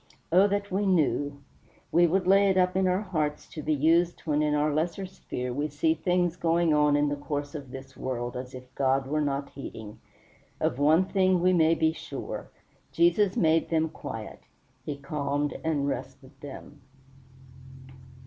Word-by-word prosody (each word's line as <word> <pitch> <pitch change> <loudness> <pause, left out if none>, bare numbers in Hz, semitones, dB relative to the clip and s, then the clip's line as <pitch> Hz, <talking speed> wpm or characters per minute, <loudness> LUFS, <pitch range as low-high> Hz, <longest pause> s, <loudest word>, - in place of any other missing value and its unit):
Oh 185 +4 +6
that 200 0 -2
we 200 +2 0
knew! 145 -5 +1 0.5
We 175 0 +5
would 185 +2 +1
lay 195 +1 +5
it 190 - +2
up 180 0 +2
in 190 0 +2
our 185 +3 +1
hearts, 155 -6 -2
to 155 - -7
be 155 +1 0
used 165 +4 +2
when 150 -2 0
in 150 -1 +1
our 150 0 +1
lesser 170 +5 -1
sphere 125 -8 -6
we 145 +4 -1
see 155 +2 +1
things 175 0 0
going 170 -1 +2
in 150 -1 +3
the 145 - -1
course 145 0 -4
of 140 -4 -7
this 135 +1 -10
world 120 -2 -4
as 125 +1 -6
if 125 0 -12
God 135 0 +1
were 150 +3 -1
not 140 -1 -2
heeding. 110 -6 -9 0.6
Of 125 - -1
one 155 +6 +4
thing 185 -1 +2
we 185 +1 +3
may 165 -1 +4
be 160 -1 +2
sure. - - -7 0.4
Jesus 215 - +3
made 160 -1 +2
them 160 -1 +1
quiet; 115 -7 -8 0.4
he 145 +1 -5
calmed 145 0 -2
and 150 -3 0
rested 135 -1 -5
them. 145 +1 -10
155 Hz, 170 wpm, -27 LUFS, 140-175 Hz, 0.6 s, Oh